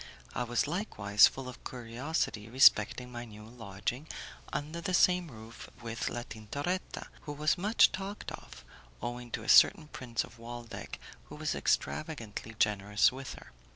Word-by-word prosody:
I 125 - -1
was 120 0 +1
likewise 105 - +4
full 135 -1 -6
of 125 - -10
curiosity 120 -2 -3
respecting 125 0 +5
my 120 0 -6
new 105 -2 -11
lodging 115 +4 -5 0.4
under 155 +4 -4
the 180 +2 0
same 180 -1 +4
roof 110 -2 -11
with 115 0 -3
La 120 - -4
Tintoretta, 140 - -4 0.2
who 150 - -4
was 150 +1 +2
much 205 +5 +4
talked 195 +2 -5
of, 60 0 -11 0.3
owing 120 - -5
to 115 - -4
a - - -9
certain 155 -1 +6
Prince 120 -5 -3
of 115 - -14
Waldeck 120 0 -7 0.3
who - - -11
was - - -2
extravagantly 110 - -2
generous 105 +1 +3
with 135 +1 -7
her. - - -14
120 Hz, 155 wpm, -31 LUFS, 110-150 Hz, 0.4 s, certain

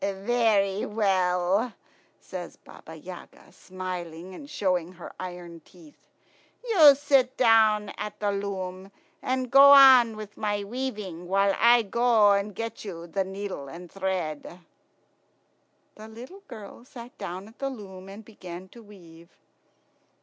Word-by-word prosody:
"Very 200 0 0
well," 195 +1 0 0.5
says - - -8
Baba - - -14
Yaga, - - -12
smiling, 180 -1 -8
and 285 +9 -11
showing 185 - -1
her 175 -1 -11
iron 175 -2 -8
teeth. 165 -4 -20 0.6
"You 315 -11 +7
sit 270 -2 +1
down 220 -3 +4
here - - -10
at 210 0 -6
the 205 -1 0
loom, 195 -1 -5 0.3
and 255 -1 -2
go 280 +1 +9
on 260 -5 +7
with 210 -1 -10
my 205 -1 -2
weaving, 205 -7 -6
while 195 +1 +2
I 235 +1 +5
go 225 -1 +3
and 200 0 -1
get 230 0 -6
you 170 -5 -8
the 180 +3 -2
needle 190 -6 -7
and 170 +4 -11
thread." 180 -3 -4 1.3
The 215 +1 -12
little 250 - -12
girl 220 -1 -11
sat 245 -1 -12
down 185 +3 -7
at 225 - -19
the 275 - -2
loom 195 -6 -10
and 205 +2 -11
began 185 -4 -11
to 235 - -15
weave. 170 -6 -16
200 Hz, 135 wpm, -26 LUFS, 185-230 Hz, 1.3 s, go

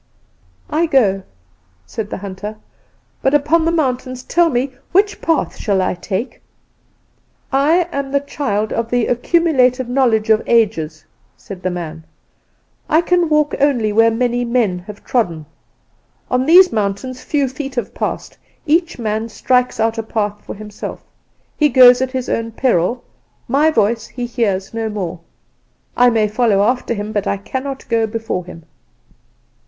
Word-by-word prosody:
"'I 325 +3 +2
go' 200 -10 +2 0.6
said 215 -2 -5
the - - -4
hunter; 200 +2 -7 0.6
'but 270 +2 +2
upon 310 +3 +2
the 330 - +2
mountains, 255 -5 -2
tell 340 +3 +2
me, 260 0 -1 0.2
which 405 +3 +2
path 325 -2 0
shall 200 -4 0
I 185 - +1
take?' 195 +6 -5 1.1
"'I 310 +6 +3
am 275 -1 -3
the 280 - +2
child 255 -7 -2
of 230 0 -2
The 245 -1 +1
Accumulated 255 -2 +2
Knowledge 235 -4 +2
of 220 - +4
Ages,' 175 -10 +1 0.3
said 190 -3 -10
the 185 - -1
man; 165 -3 -6 0.9
'I 320 +1 +4
can 350 -1 +1
walk 300 -1 +2
only 245 -7 +2
where 225 +1 +5
many 245 +1 0
men 235 -7 0
have 210 -1 -10
trodden. 170 -11 -1 0.9
On 255 +1 +1
these 365 +3 +7
mountains 215 +5 -2
few 285 -3 0
feet 265 +1 -6
have 240 - -3
passed; - - -4 0.3
each 335 +2 +1
man 220 -1 -2
strikes 250 +1 0
out 225 +1 +1
a - - +1
path 210 -2 -3
for - - -7
himself. 210 0 -8 0.5
He 300 -1 +4
goes 250 -1 +7
at 260 - 0
his 255 -1 -3
own 230 0 -2
peril: 240 -1 +1 0.4
my 285 +6 +3
voice 225 -4 +1
he 245 -1 -5
hears 210 -6 -1
no 225 -1 -2
more. 185 -5 -4 0.8
I 245 0 +5
may 220 -2 +2
follow 210 -2 +2
after 245 +1 0
him, 205 +1 -4
but 200 -1 -2
cannot 270 0 -5
go 230 -1 +1
before 220 -4 -3
him. 165 -2 -11
240 Hz, 150 wpm, -18 LUFS, 210-270 Hz, 1.1 s, these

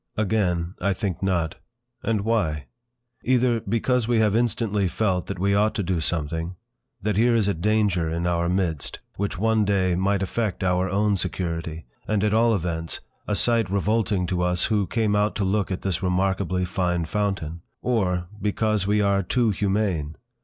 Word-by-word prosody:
Again, 90 -5 0
I 100 +2 +2
think, 95 -2 -3
not. 90 -5 0 0.4
And 110 -3 0
why? 95 -10 0 0.6
Either, 125 -2 +2
because 115 +1 0
we 120 -1 +2
have 110 -2 +3
instantly 110 -4 +1
felt 90 0 0
that - - -4
we 100 +2 +1
ought 105 +2 +2
to 100 - -1
do 90 -1 0
something; 80 +2 -2 0.5
that 105 -1 0
here 120 +2 +4
is 110 -3 +2
a 100 - +2
danger 95 -2 +1
in 85 +2 -2
our 85 0 +1
midst, 90 -5 -1 0.2
which 100 -1 -2
one 110 +2 +2
day 95 -3 +2
might 95 +2 +1
affect 105 -1 -2
our 90 0 +1
own 100 +1 +2
security; 85 -3 -3 0.2
and 105 -2 +1
at 105 0 +2
all 115 0 +4
events, 85 -3 -3 0.3
a 105 - 0
sight 115 -2 +2
revolting 100 -1 +1
to 90 0 -1
us 90 0 +1
who 100 -3 +1
came 110 -3 +1
out 105 +1 +1
to 105 - -1
look 100 +1 0
at 95 - -4
this 95 -3 -1
remarkably 95 0 0
fine 90 -2 -1
fountain. 85 -3 -2 0.2
Or, 90 -8 +1 0.2
because 105 -1 0
we 105 +1 +3
are 100 -1 +2
too 115 +4 +1
humane! 95 -6 -1
100 Hz, 175 wpm, -24 LUFS, 90-105 Hz, 0.6 s, here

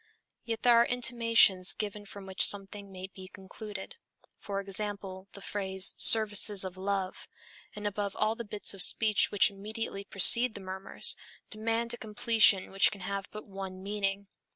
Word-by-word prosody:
Yet 230 -2 -6
there 240 -2 +4
are - - +2
intimations 230 -6 +3
given 205 -1 -7
from 200 -1 -11
which 190 0 0
something 200 0 -5
may 185 0 -9
be 190 -1 -12
concluded. 205 - -11 0.4
For 200 -1 -6
example, 195 -1 -4
the 200 - -12
phrase 190 -2 -1
"services 210 -2 +6
of 185 -1 -7
love," 190 0 -5 0.5
and 210 0 -9
above 205 -1 -4
all 215 +1 -1
the 235 +1 -8
bits 210 -2 -4
of 195 - -2
speech 215 +1 +2
which 200 -1 +3
immediately 200 0 -7
precede 235 +5 +5
the - - -8
murmurs, 190 0 -3 0.4
demand 230 +2 -3
a - - -7
completion 220 -3 +1
which 195 0 +2
can 200 - -11
have 195 +1 -6
but 215 - -11
one 190 -2 -10
meaning. 200 0 -4
200 Hz, 160 wpm, -28 LUFS, 195-215 Hz, 0.5 s, services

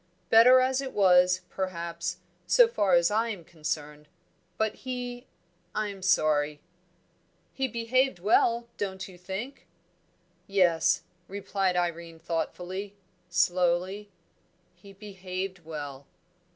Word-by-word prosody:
"Better 245 +3 +8
as 260 +1 +1
it 265 -1 -6
was, 180 -2 +4
perhaps, 170 -1 -4 0.3
so - - +6
far 205 - +2
as 170 +2 +3
I 225 +2 +1
am 200 -6 -6
concerned. 150 -2 -5 0.5
But 220 -1 0
he 245 -1 -5 0.5
I'm 205 -2 -3
sorry 150 -5 +2 0.5
" - - -41
"He 265 0 -1
behaved 240 +1 +1
well, 230 +5 +2
don't 190 -2 -4
you 185 - -13
think?" 190 +9 -7 0.8
"Yes," 180 -5 +3 0.2
replied 195 -1 -1
Irene 170 -1 -2
thoughtfully, 180 +4 -4 0.3
slowly, 180 +4 +1 0.6
"he 200 - -16
behaved 190 -2 -6
well." 145 -3 -7
190 Hz, 110 wpm, -28 LUFS, 170-215 Hz, 0.8 s, Better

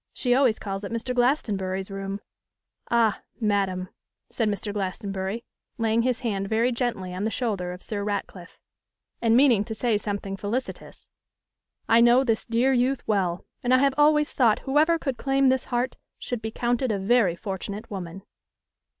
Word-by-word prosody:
She 245 -2 +1
always 250 -4 +3
calls 195 0 -5
it 200 - -5
Mr. 230 +2 -3
Glastonbury's 200 -7 0
room.' 195 +1 -5 0.7
'Ah! 230 -3 +2 0.2
madam,' 195 -4 0 0.4
said 225 -3 0
Mr. 205 0 -3
Glastonbury, 195 +2 -3 0.3
laying 225 0 +2
his 250 0 0
hand 200 -5 -2
very 230 +3 +2
gently 235 -7 -2
on 185 +2 -3
the 220 - +1
shoulder 205 -7 -2
of 180 +1 -9
Sir 205 -2 -3
Ratcliffe, 200 -3 -5 0.6
and 230 0 +4
meaning 250 -7 +5
to 220 +1 -6
say 220 -2 +1
something 200 -2 -4
felicitous, 220 +7 -5 0.8
'I 230 +1 +5
know 240 +2 +6
this 225 -4 0
dear 245 +3 +2
youth 255 +2 0
well; 185 -5 0 0.2
and 250 +1 +3
I - - +6
have 275 +1 +3
always 300 0 +3
thought 230 -5 +3
whoever 305 +5 +3
could 270 -6 -3
claim 270 -1 +3
this 260 -1 +1
heart 245 0 -2 0.2
should 245 -3 -4
be 220 - -3
counted 240 +2 0
a 205 - 0
very 195 -2 +3
fortunate 200 +2 -6
woman. 190 -1 -6
225 Hz, 165 wpm, -25 LUFS, 195-250 Hz, 0.8 s, know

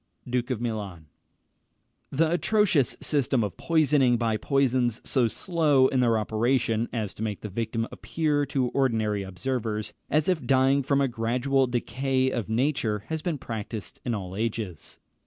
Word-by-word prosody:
Duke 125 0 -1
of 125 -4 -1
Milan. 105 -8 -4 1.0
The 160 +3 +1
atrocious 175 - +2
system 135 -5 +1
of 100 - -3
poisoning 145 -6 +3
by 115 -1 0
poisons 125 -2 +1
so 125 -4 +2
slow 150 -1 +2
in 130 - +1
their 115 -2 +3
operation 115 +1 0
as 110 -4 -3
to - - -11
make 105 -3 -3
the 105 - -5
victim 115 +2 -2
appear, 150 -3 -1
to 130 -2 0
ordinary 110 -7 +1
observers, 105 +2 -3 0.2
as 150 +1 +2
if 180 -4 +1
dying 135 +1 +4
from 140 +1 +1
a 135 - +3
gradual 125 +3 +1
decay 130 +2 0
of 115 -4 -3
nature, 115 -4 0
has 160 -1 -2
been 170 -3 -2
practised 110 -5 -6
in 120 -2 -1
all 95 -2 -6
ages. 105 -6 -4
125 Hz, 155 wpm, -26 LUFS, 110-140 Hz, 1.0 s, dying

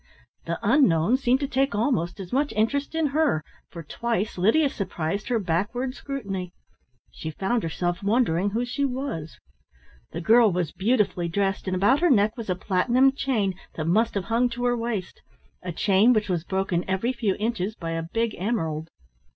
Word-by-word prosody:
The - - -2
unknown 210 - +4
seemed 265 0 +1
to 280 - 0
take 270 -3 0
almost 205 -6 0
as 185 +1 -8
much 285 +2 +1
interest 280 +8 0
in 325 -1 +1
her, 300 - +2 0.3
for 170 -2 -9
twice 220 +5 -2
Lydia 225 - +3
surprised 195 - -3
her 245 - +1
backward 210 +8 -1
scrutiny. 200 -11 -5 0.6
She 160 - -6
found 195 +9 -1
herself 175 +1 -2
wondering 200 -3 +2
who 230 +4 -1
she 250 +4 -2
was. 255 - -3 0.7
The 170 - -6
girl 220 +5 +5
was 175 -3 -1
beautifully 200 -5 +1
dressed, 195 +3 -1
and 185 - 0
about 205 +10 +3
her 350 +1 +3
neck 215 -4 +3
was 230 -4 -7
a 185 - +1
platinum 235 +9 +3
chain 240 -8 0 0.2
that 155 - -3
must 215 +8 +2
have 200 - -1
hung 235 +3 +1
to 240 +1 -4
her 245 0 +2
waist 230 -5 -4 0.4
a 180 - -5
chain 200 +7 +4
which 215 -3 0
was 175 -3 0
broken 190 -2 -1
every 195 +7 0
few 220 -6 0
inches 215 -2 -2
by 165 -5 -5
a 165 0 -2
big 225 +7 -2
emerald. 165 -7 -2
210 Hz, 175 wpm, -25 LUFS, 180-245 Hz, 0.7 s, girl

